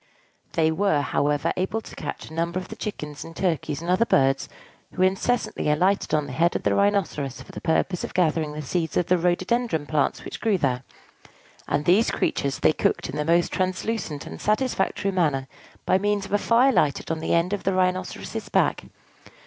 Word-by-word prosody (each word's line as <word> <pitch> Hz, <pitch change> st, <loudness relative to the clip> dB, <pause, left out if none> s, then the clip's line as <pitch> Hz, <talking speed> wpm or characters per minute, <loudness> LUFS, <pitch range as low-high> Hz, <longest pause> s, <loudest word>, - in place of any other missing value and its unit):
They 160 Hz, -1 st, +3 dB
were, 160 Hz, -3 st, +2 dB
however, 145 Hz, 0 st, 0 dB
able 190 Hz, +4 st, -1 dB
to -, -, -12 dB
catch -, -, -6 dB
numbers 170 Hz, +3 st, -2 dB
of -, -, -14 dB
the -, -, -7 dB
chickens 150 Hz, -8 st, -6 dB
and 165 Hz, -, -11 dB
turkeys 160 Hz, -4 st, -1 dB
and 175 Hz, -, -1 dB
other 185 Hz, +5 st, +4 dB
birds 135 Hz, 0 st, +2 dB, 0.4 s
who 185 Hz, -, +1 dB
incessantly 195 Hz, 0 st, 0 dB
alighted 185 Hz, +6 st, +2 dB
on 150 Hz, -1 st, +1 dB
the 140 Hz, -, -7 dB
head 165 Hz, +6 st, +2 dB
of -, -, -2 dB
the -, -, +2 dB
Rhinoceros 195 Hz, -10 st, 0 dB
for -, -, -14 dB
the -, -, -8 dB
purpose 175 Hz, +2 st, 0 dB
of -, -, -6 dB
gathering 160 Hz, -3 st, +1 dB
the 150 Hz, 0 st, -5 dB
seeds 160 Hz, +1 st, -1 dB
of 175 Hz, -, +2 dB
the 180 Hz, -, +3 dB
rhododendron 180 Hz, 0 st, 0 dB
plants 150 Hz, -1 st, 0 dB
which -, -, -7 dB
grew 220 Hz, -4 st, +2 dB
there; 130 Hz, -6 st, 0 dB, 0.9 s
and 145 Hz, +1 st, 0 dB
these 195 Hz, +7 st, +4 dB
creatures 140 Hz, -1 st, -1 dB
they -, -, +4 dB
cooked -, -, 0 dB
in -, -, -7 dB
the 150 Hz, -, 0 dB
most 170 Hz, +2 st, +2 dB
translucent 185 Hz, -4 st, -2 dB
and -, -, -9 dB
satisfactory 210 Hz, -3 st, 0 dB
manner 150 Hz, -8 st, +1 dB, 0.4 s
by 185 Hz, -, +3 dB
means 205 Hz, 0 st, 0 dB
of 195 Hz, -, -8 dB
a 205 Hz, -, +4 dB
fire 240 Hz, +5 st, +4 dB
lighted 150 Hz, -, +1 dB
on 160 Hz, -, -1 dB
the 160 Hz, -, 0 dB
end 170 Hz, +3 st, +1 dB
of 205 Hz, -, -2 dB
the 195 Hz, -, 0 dB
Rhinoceros's 185 Hz, 0 st, -2 dB
back. -, -, +1 dB
175 Hz, 195 wpm, -24 LUFS, 150-195 Hz, 0.9 s, other